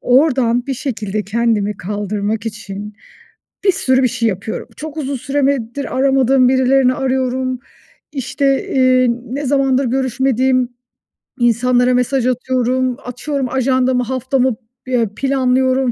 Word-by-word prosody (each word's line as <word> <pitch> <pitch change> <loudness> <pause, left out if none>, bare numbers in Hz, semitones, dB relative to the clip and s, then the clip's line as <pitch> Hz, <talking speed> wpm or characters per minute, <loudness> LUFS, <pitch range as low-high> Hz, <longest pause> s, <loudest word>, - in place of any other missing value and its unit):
Oradan 250 -3 +2
bir 270 - -2
şekilde 215 -6 -3
kendimi 215 -1 0
kaldırmak 205 +2 -3
için 210 -1 -6 0.7
bir 385 - +6
sürü 260 -5 +1
bir - - +4
şey 235 -2 0
yapıyorum. 200 +3 -5
Çok 310 0 -7
uzun 280 -2 -2
süremedir 275 -1 -1
aramadığım 265 -1 +3
birilerini 260 0 +3
arıyorum. 255 -1 -1 0.5
İşte, 275 0 0
eee, 255 -1 +3 0.2
ne 270 +4 -4
zamandır 270 -1 +2
görüşmediğim 260 0 +1 0.7
insanlara 245 +1 +3
mesaj 250 0 +1
atıyorum. 255 0 0
Açıyorum 255 +1 -3
ajandamı, 260 -1 +1
haftamı, 260 0 0 0.3
ya, 235 -5 +1
planlıyorum 260 -1 +1
255 Hz, 115 wpm, -17 LUFS, 235-265 Hz, 0.7 s, bir